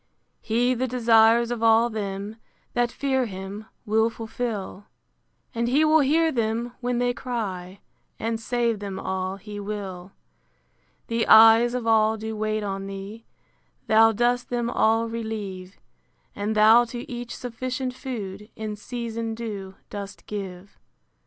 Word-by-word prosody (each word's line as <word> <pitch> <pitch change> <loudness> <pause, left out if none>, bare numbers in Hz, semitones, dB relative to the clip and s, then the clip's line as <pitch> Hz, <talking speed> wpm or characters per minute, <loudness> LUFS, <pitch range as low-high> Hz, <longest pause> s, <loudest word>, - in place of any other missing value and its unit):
He 245 +3 +1
the 255 +1 -1
desires 235 -1 +4
of 240 -2 -3
all 225 +1 +5
them 205 -1 -5 0.4
That 240 -1 +1
fear 265 -3 0
him, 195 +2 -7 0.2
will 220 +2 +2
fulfil; 220 -3 -5 0.7
And 235 0 -1
he 285 +6 +3
will 310 +1 +5
hear 320 +3 +3
them 235 0 -1
when 245 0 -1
they 245 0 +1
cry, 200 -7 -5 0.4
And 225 0 -2
save 235 -1 0
them 195 -2 -5
all 190 0 -3
he 205 +1 -8
will. 200 -3 -6 0.9
The 230 0 -1
eyes 225 +2 +7
of 245 -2 -3
all 220 -1 +3
do 220 0 -5
wait 215 0 -1
on 195 -1 -4
thee; 195 +3 -8 0.6
Thou 225 +1 +6
dost 240 +3 0
them 240 -1 -1
all 225 0 +2
relieve: 210 -5 -5 0.6
And 210 +2 -2
thou 220 +3 +7
to 240 +3 -7
each 240 -3 -6
sufficient 255 +1 -4
food, 210 -6 -6
In 215 -1 -5
season 230 0 -4
due, 205 -4 -6 0.2
dost 200 -1 -7
give. 195 -2 -7
225 Hz, 140 wpm, -25 LUFS, 205-240 Hz, 0.9 s, eyes